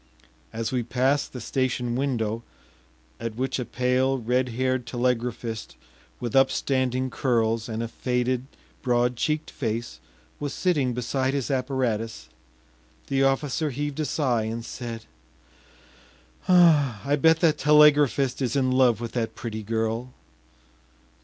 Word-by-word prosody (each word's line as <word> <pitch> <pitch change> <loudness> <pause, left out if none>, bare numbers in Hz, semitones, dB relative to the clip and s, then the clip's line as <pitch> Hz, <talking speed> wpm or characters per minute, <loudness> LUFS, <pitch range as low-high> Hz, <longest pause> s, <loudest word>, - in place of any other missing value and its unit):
As 115 0 -3
we 125 -1 0
passed 130 +4 0
the 125 - -7
station 125 0 -1
window, 115 -4 -1 0.8
at 115 -1 -4
which 130 +2 -2
a 125 - -2
pale, 125 +2 +1
red 125 +2 0
haired 130 +1 -1
telegraphist 120 -2 -2 0.4
with 120 -1 -4
upstanding 130 -1 +2
curls 115 -3 0
and 110 +1 -3
a - - -3
faded, 125 +2 -1 0.3
broad 125 -1 +1
cheeked 155 +5 -1
face 115 - -4 0.4
was 145 -2 -4
sitting 145 -9 +1
beside 130 +2 -1
his 140 0 -2
apparatus, 125 -4 -2 0.8
the 135 0 +1
officer 135 +3 +1
heaved 145 +2 -4
a 155 - 0
sigh 125 -5 0
and 115 +1 -4
said: 115 -2 -6 1.4
“I 145 - +4
bet 160 0 +5
that 155 -3 +3
telegraphist 145 -3 +4
is 125 -1 0
in 130 -2 +2
love 130 -3 +3
with 115 - -4
that 115 -2 -2
pretty 110 -2 -5
girl. 115 +3 -2
125 Hz, 125 wpm, -25 LUFS, 115-135 Hz, 1.4 s, bet